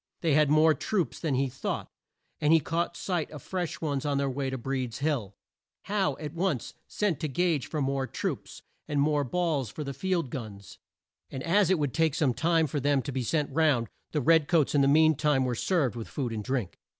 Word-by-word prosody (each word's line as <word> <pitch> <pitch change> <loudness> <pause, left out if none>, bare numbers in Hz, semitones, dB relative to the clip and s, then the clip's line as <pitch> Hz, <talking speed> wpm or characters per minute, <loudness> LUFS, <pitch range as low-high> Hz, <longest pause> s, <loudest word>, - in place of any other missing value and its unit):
They 160 -4 +2
had 150 0 +4
more 155 +1 +5
troops 185 +2 -2
than 155 -5 -1
he 135 +1 +1
thought, 125 - -4 0.5
and 150 - +2
he 165 - +7
caught 170 +3 -2
sight 175 -5 -2
of 150 -4 -10
fresh 180 -3 -4
ones 145 -4 -1
on 145 -1 0
their 140 -1 0
way 135 +1 -2
to 130 - -3
Breed's 130 -1 -3
Hill. 135 -9 -1 0.5
Howe 200 -2 0
at 150 -1 -6
once 170 - -1
sent 205 -7 -1
to 155 - -1
Gage 160 -1 0
for 150 -3 -2
more 135 0 -1
troops, - - -5 0.2
and 145 - -1
more 145 0 +2
balls 150 - -1
for 150 - -6
the 140 -1 -5
field 175 -5 -1
guns, 100 -6 -8 0.5
and 130 - -6
as 195 +3 +3
it 190 - +4
would 145 -4 -1
take 160 -3 +2
some 145 -8 +2
time 165 +3 +2
for 145 0 -2
them 140 -1 +1
to 145 - -4
be 130 0 -2
sent 150 +4 -1
round, 140 -7 +2 0.2
the 150 - 0
red 160 +1 +4
coats 160 -5 +2
in 145 - +4
the 135 - +4
mean 155 +2 +5
time 140 -2 +2
were 125 - 0
served 140 0 0
with 115 -2 -6
food 125 -5 -3
and 105 -1 -4
drink. 125 -6 -3
145 Hz, 220 wpm, -28 LUFS, 130-165 Hz, 0.5 s, he